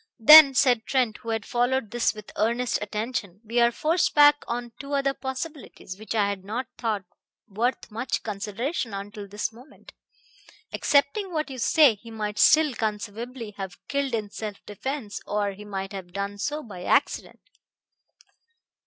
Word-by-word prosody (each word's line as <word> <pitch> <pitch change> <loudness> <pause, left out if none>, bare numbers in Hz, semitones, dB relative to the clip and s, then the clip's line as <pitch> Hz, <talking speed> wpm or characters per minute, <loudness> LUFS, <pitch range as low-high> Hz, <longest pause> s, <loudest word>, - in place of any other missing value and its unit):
"Then," 285 +3 +10
said 245 -4 +3
Trent, 250 -6 +1
who 230 - -9
had 225 -1 -2
followed 245 -2 0
this 240 -1 +1
with 215 -1 -11
earnest 235 +3 0
attention, 210 -2 -4
"we 235 +3 0
are 235 0 +5
forced 320 +8 0
back 290 0 +6
on 240 0 -4
two 280 +1 -7
other 275 -1 +1
possibilities, 265 - -7
which 215 +1 -5
I 205 -2 +3
had 200 -2 -4
not 225 +6 -3
thought 215 -5 -2 0.4
worth 230 +4 -2
much 230 +5 -3
consideration 215 - -3
until 205 +1 -7
this 205 +2 -4
moment. 250 +6 -16 0.8
Accepting 295 +8 +1
what 310 -3 -2
you 260 - -7
say, 290 +1 +5
he 225 +3 -14
might 210 -2 -4
still 310 -3 +5
conceivably 220 +2 -4
have 190 -2 -6
killed 280 -3 -1
in 210 -2 -4
self 210 -2 -7
defense; 220 +1 -5
or 205 -1 0
he 205 +2 -11
might 195 -1 -5
have 180 -3 -8
done 200 +1 -4
so 300 +7 -3
by 190 -7 -9
accident." - - 0
230 Hz, 160 wpm, -25 LUFS, 205-265 Hz, 0.8 s, Then